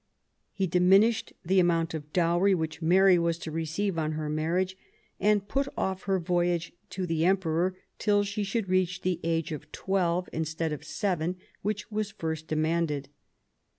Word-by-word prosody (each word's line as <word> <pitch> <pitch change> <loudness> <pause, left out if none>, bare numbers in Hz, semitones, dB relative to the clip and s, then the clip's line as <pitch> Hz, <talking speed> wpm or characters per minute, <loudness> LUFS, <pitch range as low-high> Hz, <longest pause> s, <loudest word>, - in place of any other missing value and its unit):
He 195 - -1
diminished 190 +6 +4
the 190 +3 +3
amount 165 -2 +2
of 150 -1 -6
dowry 175 +3 +3
which 160 -1 -3
Mary 185 +2 +5
was 170 -1 +1
to 165 -2 -6
receive 165 +4 -1
on 155 0 -1
her 155 -1 -3
marriage, 170 +5 0 0.4
and 205 0 +2
put 275 +5 0
off 190 0 -2
her 195 -1 +2
voyage 175 -1 0 0.2
to 185 -1 -3
the 165 -2 0
Emperor 185 0 +1 0.2
till 205 -1 +3
she 205 +1 -2
should 200 +1 -2
reach 185 0 +1
the 185 -2 0
age 165 0 0
of 150 0 -7
twelve, 180 -2 0
instead 160 0 -2
of 150 - -6
seven, 180 -4 -1 0.3
which 210 +2 -3
was 215 -1 -1
first 160 -6 -4
demanded. 155 -3 0
175 Hz, 160 wpm, -28 LUFS, 160-190 Hz, 0.4 s, Mary